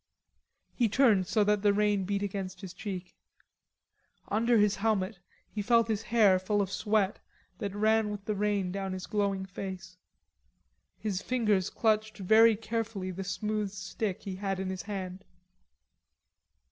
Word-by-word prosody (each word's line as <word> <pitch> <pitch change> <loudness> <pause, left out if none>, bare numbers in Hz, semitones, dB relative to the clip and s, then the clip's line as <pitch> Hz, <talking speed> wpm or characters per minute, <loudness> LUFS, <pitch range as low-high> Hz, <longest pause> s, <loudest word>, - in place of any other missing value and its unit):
He 235 -3 +2
turned 210 -6 +4
so 215 +2 +3
that 210 0 +2
the 205 -1 +4
rain 205 -2 +2
beat 200 +1 -1
against 195 -1 -4
his 190 -3 -7
cheek. 185 -1 -6 1.2
Under 230 +3 +3
his 210 -1 +3
helmet 200 -2 0 0.3
he 210 - -4
felt 230 +2 +3
his 215 -1 0
hair 215 -4 +4
full 205 +3 0
of 195 -1 0
sweat 205 -1 +1 0.4
that 200 -2 -4
ran 220 +1 +3
with 205 -1 -6
the 215 - 0
rain 205 -2 0
down 195 0 -3
his 185 -1 -5
glowing 200 -2 -1
face. 185 -1 -7 1.0
His 200 -3 -2
fingers 215 -7 +1
clutched 215 -1 0
very 220 +3 +6
carefully 220 -3 -3
the 190 +2 -5
smooth 210 +2 -2
stick 195 0 -4
he 190 -2 -5
had 195 -1 -2
in 190 0 -2
his 185 -1 -4
hand. 190 -1 -6
205 Hz, 150 wpm, -30 LUFS, 190-215 Hz, 1.2 s, very